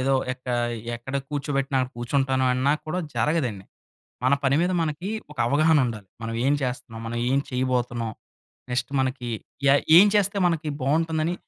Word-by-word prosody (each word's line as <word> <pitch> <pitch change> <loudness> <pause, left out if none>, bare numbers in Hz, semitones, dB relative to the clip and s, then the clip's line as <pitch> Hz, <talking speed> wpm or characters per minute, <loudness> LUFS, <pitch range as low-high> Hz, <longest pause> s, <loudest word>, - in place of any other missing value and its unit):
ఏదో 135 +1 +2 0.2
ఎక్క 125 0 -13 0.5
ఎక్కడ 125 +3 -8
కూర్చోబెట్టిన 140 -1 -1 0.2
కూర్చుంటాను 130 +2 0
అన్నా 130 +3 +2
కూడా 180 +4 -2 0.2
జరగదండి. 125 -11 0 0.6
మన 130 - +4
పని 135 0 +3
మీద 180 - +1
మనకి 165 +5 -3 0.2
ఒక 150 - -13
అవగాహన 155 +2 +4
ఉండాలి. 110 -4 -5
మనం 115 0 -4
ఏం 140 - +4
చేస్తన్నాం, 125 -3 -4
మనం 120 +1 -3
ఏం 135 - +3
చేయబోతున్నాం. 125 -3 -1 0.6
నెక్స్ట్ 125 +1 -1
మనకి 130 -2 -1 0.4
ఏ - - +7 0.2
ఏం 195 - +9
చేస్తే 200 0 +2
మనకి 165 -3 0
బాగుంటుందని 160 +4 +1
135 Hz, 145 wpm, -25 LUFS, 125-155 Hz, 0.6 s, ఏం